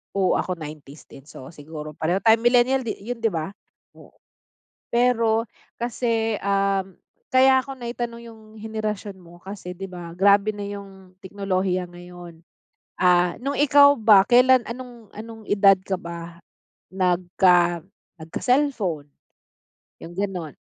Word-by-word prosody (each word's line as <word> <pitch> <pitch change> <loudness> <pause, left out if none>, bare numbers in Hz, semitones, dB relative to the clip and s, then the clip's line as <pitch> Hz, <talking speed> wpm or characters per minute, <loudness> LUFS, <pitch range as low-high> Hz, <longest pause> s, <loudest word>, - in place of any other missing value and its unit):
Oo, 190 -2 +2
ako 185 - -2
90s 150 -2 -11
din 135 +1 -14
so 130 0 -11
siguro 150 0 -9
pareho 175 +5 -2
tayo 225 0 +5
millennial 245 +1 +2
di - - -2
yun 240 +1 -5
di 225 - +1
ba, 165 -2 -3 0.5
oo. - - -18 0.7
Pero 230 -2 +2 0.3
kasi, 230 -2 -2
um, 195 -1 -1 0.3
kaya 260 0 +5
ako 270 +1 -7
naitanong 235 -1 -6
yung 220 -1 -16
henerasyon 215 -3 -5
mo 175 -1 -16
kasi 190 -2 -8
di 195 - -9
ba, 170 -1 -9
grabe 200 +2 +3
na 205 - -6
yung 195 -2 -10
teknolohiya 185 -2 -2
ngayon. 175 -1 -12 0.6
Ah, 180 -1 +3
nung 275 +3 -3
ikaw 285 0 +6
ba, 215 -6 +5
kailan 250 0 +5
anong 240 -3 -10
anong 225 0 -10
edad 195 -1 +4
ka 190 +1 -6
ba 170 0 -9 0.5
nagka 180 -1 +2 0.4
nagka-cellphone? 195 - -1 0.9
Yung 175 +2 -11
ganun. 180 -7 -4
195 Hz, 130 wpm, -23 LUFS, 175-230 Hz, 0.9 s, ikaw